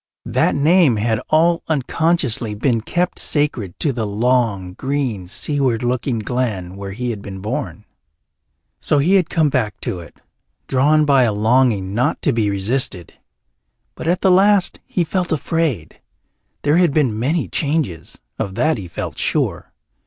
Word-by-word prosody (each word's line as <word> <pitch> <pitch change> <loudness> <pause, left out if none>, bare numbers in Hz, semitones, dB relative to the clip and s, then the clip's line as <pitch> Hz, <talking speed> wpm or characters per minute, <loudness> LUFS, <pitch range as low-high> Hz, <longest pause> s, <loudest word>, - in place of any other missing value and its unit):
That - - +1
name 155 -2 +4
had 110 +1 0
all 165 +2 +3
unconsciously 140 -6 0
been 115 +1 0
kept 175 +10 -1
sacred 125 - -1
to 145 - +2
the 115 -3 -2
long, 105 -4 0
green, 130 -6 -3
seaward 125 +3 -1
looking 125 0 -1
glen 105 -6 -3
where 100 0 -7
he 120 +3 -3
had 105 -3 -6
been 95 -1 -8
born. 105 +3 -5 0.9
So 150 - +1
he 155 +7 +3
had 185 -4 +3
come 160 -3 +2
back 110 -7 -1
to 90 - -2
it, 85 - -13 0.5
drawn 150 +4 +3
by 140 -2 +4
a 120 -3 +3
longing 110 -2 +2
not 125 +7 0
to 145 - +2
be 110 -3 +1
resisted. 100 - -1 0.8
But - - -7
at 175 +2 +1
the 190 - +4
last 195 +1 +3
he 180 - 0
felt 180 +2 -2
afraid. 155 - -2 0.6
There 145 +3 +3
had 175 -5 +3
been 125 -8 +1
many 150 +8 0
changes, 145 - -2 0.2
of 95 -1 -3
that 155 -1 +1
he 95 - -7
felt 85 - -6
sure. - - -1
125 Hz, 155 wpm, -19 LUFS, 105-155 Hz, 0.9 s, name